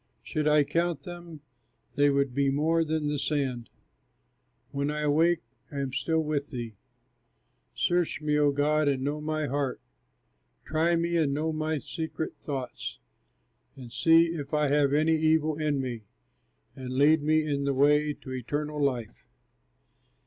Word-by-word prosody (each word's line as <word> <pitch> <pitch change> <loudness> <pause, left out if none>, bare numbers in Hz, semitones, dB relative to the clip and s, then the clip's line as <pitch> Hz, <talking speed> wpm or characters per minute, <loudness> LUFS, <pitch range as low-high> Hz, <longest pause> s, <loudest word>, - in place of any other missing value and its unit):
Should 150 -1 -2
I 150 -1 +5
count 170 -1 -1
them, 175 -2 -9 0.5
they 145 0 +4
would 140 -2 +1
be 140 +1 +2
more 160 +4 +2
than 155 -1 -1
the 145 -1 -1
sand; 130 -6 -2 1.0
When 140 +1 -1
I 150 0 -2
awake, 160 +3 +2 0.3
I 145 - -6
am 135 -2 -3
still 160 +4 0
with 150 -2 -2
thee. 120 -5 -6 1.0
Search 175 -2 +1
me, 150 -1 0
O 145 -1 +4
God, 150 +2 +1
and 135 -2 +1
know 145 +2 -2
my 155 0 -1
heart, 140 -1 -2 0.9
Try 165 +2 +1
me, 170 +1 0
and 145 -4 +1
know 160 +2 -1
my 155 0 -1
secret 160 +2 -5
thoughts, 135 -4 -5 0.8
And 125 -3 -11
see 165 +4 +5
if 150 -3 -4
I 150 -1 +2
have 145 -1 +3
any 155 +3 +3
evil 155 -1 +2
in 150 -3 0
me, 120 -5 -4 0.7
And 130 -1 -6
lead 150 +3 +5
me 155 +1 +2
in 140 -2 -1
the 140 - +1
way 150 +2 +4
to 130 - -11
eternal 145 +4 -3
life. 125 -6 -2
150 Hz, 155 wpm, -28 LUFS, 140-155 Hz, 1.0 s, I